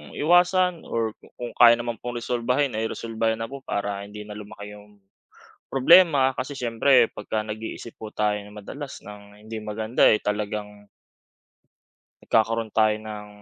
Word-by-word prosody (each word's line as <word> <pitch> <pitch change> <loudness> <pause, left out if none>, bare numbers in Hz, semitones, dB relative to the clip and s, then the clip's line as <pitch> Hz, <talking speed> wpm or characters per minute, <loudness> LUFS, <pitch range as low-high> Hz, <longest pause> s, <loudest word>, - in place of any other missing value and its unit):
iwasan 180 +2 +3
or 115 -2 -2
ku - - -18
kung 120 -1 -5
kaya 120 -1 +8
naman 120 0 -3
pong 120 0 -5
resolbahin 125 +2 0
ay 110 +1 -1
resolbahin 115 0 -2
na 115 - -3
po 140 - -7
para 100 -2 -3
hindi 105 +1 -9
na 105 - -8
lumaki 105 0 -9
yung 105 0 -17 0.7
problema 140 -2 +5
kasi 130 +3 -4
siyempre 120 0 +3
pagka 110 +1 -3
nag-iisip 110 +1 -7
po 110 - -8
tayo 105 -1 +1
nang 105 +1 -12
madalas 140 +7 -8
ng 105 0 -12
hindi 110 0 -5
maganda, 110 +3 -2
eh, 105 - +4
talagang 105 0 -4 1.5
nagkakaroon 110 0 +1
tayo 110 -1 +3
ng 105 -1 -8
110 Hz, 150 wpm, -24 LUFS, 105-125 Hz, 1.5 s, kaya